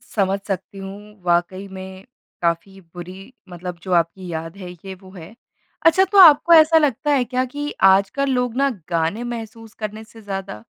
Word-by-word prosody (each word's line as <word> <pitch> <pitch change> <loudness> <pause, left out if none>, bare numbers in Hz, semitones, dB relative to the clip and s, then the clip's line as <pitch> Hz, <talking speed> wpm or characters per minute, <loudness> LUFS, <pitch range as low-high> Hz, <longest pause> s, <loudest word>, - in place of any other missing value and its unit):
समझ 195 -1 +1
सकती 195 0 -5
हूँ। 200 +1 -10
वाक़ई 175 +3 0
में 190 +1 -10 0.4
काफ़ी 175 +3 -2
बुरी 175 +2 -11 0.3
मतलब 175 0 -8
जो 185 - -6
आपकी 175 +2 0
याद 165 +3 -6
है 180 -2 -8
ये 190 +2 -10
वो 185 - -14
है। 185 +3 -12 0.5
अच्छा 330 +3 +6
तो 405 - +2
आपको 340 -1 +8
ऐसा 320 0 +7
लगता 295 -1 +1
है 275 -3 +3
क्या 255 +1 +1
कि 290 0 -4 0.2
आजकल 200 +9 +1
लोग 250 -2 -1
ना 275 +1 +3 0.2
गाने 170 +7 -1
महसूस 225 -2 -8
करने 215 0 -6
से 225 0 -16
ज़्यादा 195 - -6
195 Hz, 175 wpm, -21 LUFS, 180-245 Hz, 0.5 s, आपको